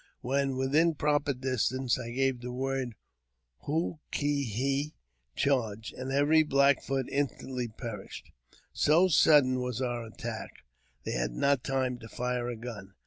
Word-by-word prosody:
When 135 +1 0
within 150 +5 +3
proper 145 0 +1
distance, 130 -1 0
I 120 -2 -5
gave 130 0 0
the 125 0 -5
word 130 -2 -2 0.7
Hoo 160 +2 -1
ki 145 -3 0
hi 135 +7 -1 0.4
(charge), 115 -6 0
and 130 +1 -5
every 145 +3 +4
Black 140 -2 +4
Foot 135 -1 -1
instantly 135 -3 -2
perished. 110 -3 -8 0.4
So 170 +5 +4
sudden 145 -6 +5
was 125 -2 -3
our 120 -2 -2
attack, 115 - -7 0.4
they - - -3
had - - -1
not 140 - +2
time 130 -2 -1
to 115 -1 -11
fire 125 0 -2
a 120 - -3
gun. 110 -4 -8
130 Hz, 140 wpm, -30 LUFS, 120-140 Hz, 0.7 s, sudden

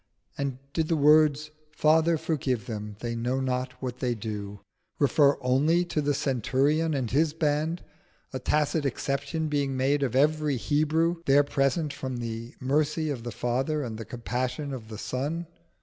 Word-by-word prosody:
And 140 -2 -2 0.2
did 160 0 0
the 165 - +1
words 150 0 +4 0.2
"Father, 160 +2 +3
forgive 130 -7 -1
them, 105 -3 -5
they 120 -1 -2
know 120 +3 -1
not 130 0 -1
what 125 -1 -4
they 125 -2 0
do," 105 -2 -6 0.4
refer 140 0 +4
only 145 +7 +3
to 155 -3 -1
the 145 0 +1
centurion 140 +5 +1
and 125 -5 -2
his 150 +3 +2
band, 155 +2 0 0.5
a 130 - -2
tacit 150 +3 +1
exception 140 +3 -2
being 140 -3 -1
made 140 +2 +2
of 130 -3 -1
every 150 0 +2
Hebrew 155 +6 +1
there 140 +1 +6
present 140 +2 0
from 130 -2 -4
the 115 0 -5
mercy 150 +3 0
of 130 -5 -4
the 120 +1 -5
Father 130 +7 -1
and 115 -3 -5
the - - -4
compassion 125 +4 -3
of 115 -4 -7
the 110 -1 -8
Son? 145 +9 -3
140 Hz, 165 wpm, -27 LUFS, 125-155 Hz, 0.5 s, there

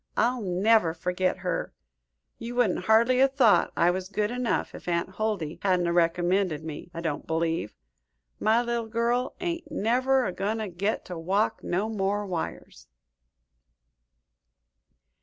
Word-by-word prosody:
I'll 245 +2 +2
never 185 -2 +2
forget 180 +2 -1
her. 180 - -2 0.6
You 235 +1 -6
wouldn't 245 -2 +1
hardly 235 +3 +4
'a' 270 - +6
thought 265 -6 +3
I 175 +1 +4
was 185 +1 -4
good 210 +2 -1
enough, 250 -1 -1
if - - -11
Aunt 170 0 0
Huldy 205 -8 -2
hadn't 185 -3 +2
a 170 - 0
recommended 175 -1 +1
me, 160 +1 -7
I 165 - -6
don't 160 -4 -3
believe. 165 -6 -1 0.6
My 225 +3 +3
little 235 -1 -2
girl 235 +3 0
ain't 340 -1 -4
never 255 +4 +2
a - - -1
goin' 205 +4 -2
to 215 -2 -3
get 195 +5 -2
to 180 -2 -6
walk 200 +6 0
no 190 +5 -1
more 205 -1 -1
wires." 180 -4 -6
200 Hz, 145 wpm, -27 LUFS, 175-230 Hz, 0.6 s, a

